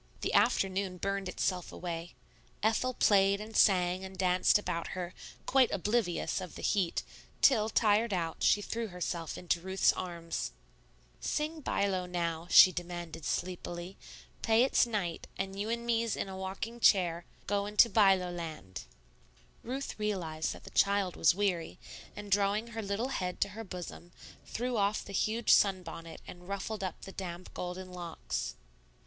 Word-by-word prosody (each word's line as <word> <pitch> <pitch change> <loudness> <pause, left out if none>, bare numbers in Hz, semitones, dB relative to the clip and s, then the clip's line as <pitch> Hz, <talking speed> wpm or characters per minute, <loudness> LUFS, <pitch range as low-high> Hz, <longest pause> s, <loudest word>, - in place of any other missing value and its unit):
The - - -1
afternoon 190 -1 +2
burned 195 0 -2
itself 180 -1 -2
away. 170 -1 -6 0.5
Ethel 230 +4 +1
played 200 -1 +4
and 215 +1 -8
sang 180 -1 +4
and 190 0 -8
danced 185 +1 +4
about 180 -5 -3
her, 180 0 -4 0.3
quite 260 -2 +4
oblivious 200 -2 0
of 180 - -8
the - - -8
heat, 190 -5 +1 0.4
till, 220 -5 +5
tired 220 +1 +3
out, 165 -4 -2
she 205 - +4
threw 230 +2 -3
herself 175 -3 -4
into 175 -1 -1
Ruth's 190 +1 +3
arms. 170 - -4 0.7
"Sing 310 +2 -2
by 200 - 0
low 185 -2 -1
now," 170 -2 -2
she 185 - +9
demanded 175 -3 -6
sleepily; 175 +1 -3 0.5
"pay 225 +1 +4
it's 260 - +3
night, 195 -7 -3
and 195 +1 -4
you 210 +2 -2
and 235 0 -2
me's 230 -1 +1
in - - -3
a 190 - -7
yockin' 195 +5 -5
chair 175 -6 +4 0.2
goin' 205 +1 -2
to 235 - +9
by 205 -4 +5
low 180 -1 -4
land." 160 - -7 0.8
Ruth 265 0 -5
realized 175 -7 -2
that - - -13
the - - -11
child 200 -2 +2
was 165 - +4
weary, 185 -5 -1 0.4
and 205 -1 -8
drawing 205 +3 +2
her 225 -1 -5
little 205 +5 -2
head 180 -8 -3
to - - +2
her 220 +3 -7
bosom, 180 -2 -8 0.3
threw 245 +1 -2
off 205 +1 +1
the 200 - -9
huge 220 +3 +1
sunbonnet 165 -4 +1
and 175 0 -11
ruffled 200 +1 -3
up 185 -3 -4
the 195 - -8
damp, 180 -2 -7
golden 180 +1 -5
locks. 175 -2 -4
190 Hz, 160 wpm, -31 LUFS, 175-210 Hz, 0.8 s, she